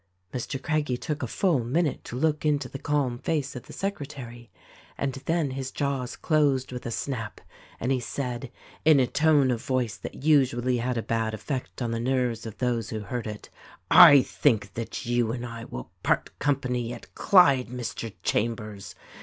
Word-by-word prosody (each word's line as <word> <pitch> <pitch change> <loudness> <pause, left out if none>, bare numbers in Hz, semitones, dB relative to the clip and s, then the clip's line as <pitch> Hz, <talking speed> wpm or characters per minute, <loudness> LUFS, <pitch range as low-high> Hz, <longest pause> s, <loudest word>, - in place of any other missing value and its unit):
Mr. 130 +2 -3
Craggie 150 -3 0
took 150 +3 -4
a 130 - -2
full 155 - +1
minute 150 +5 0
to - - -7
look 155 +2 +1
into 145 -3 +1
the 135 - -8
calm 135 -5 0
face 145 -3 -2
of 125 - -8
the - - -11
secretary, 140 -11 -5 0.5
and 135 -1 -1
then 165 -4 +1
his 130 0 -4
jaws 135 -3 -2
closed 145 -5 +1
with 125 -1 -6
a - - -2
snap 115 -2 -4 0.4
and 125 - -1
he 130 - +2
said 125 0 -4 0.2
— - - -24
in 155 -3 +6
a 130 - +4
tone 145 -1 +3
of 115 -2 -2
voice 125 -4 0
that - - -8
usually 130 -5 +3
had 120 +1 -1
a 115 - -1
bad 115 -1 -1
effect 130 +2 -4
on 115 - -2
the 115 - -1
nerves 120 -2 0
of 110 -1 -9
those 120 -3 -1
who 110 -1 -4
heard 115 +3 -4
it 105 -1 -8 0.3
— 90 0 -39 0.2
"I 140 -2 +7
think 110 -9 +1
that 115 -1 -5
you 120 -1 +1
and 120 0 -4
I 115 -1 -7
will 60 -1 -8
part - - 0
company 125 -4 0
at 120 - -12
Clyde, 140 -10 +5
Mr. 120 -2 -5
Chambers 105 -2 -2
125 Hz, 185 wpm, -27 LUFS, 115-140 Hz, 0.5 s, I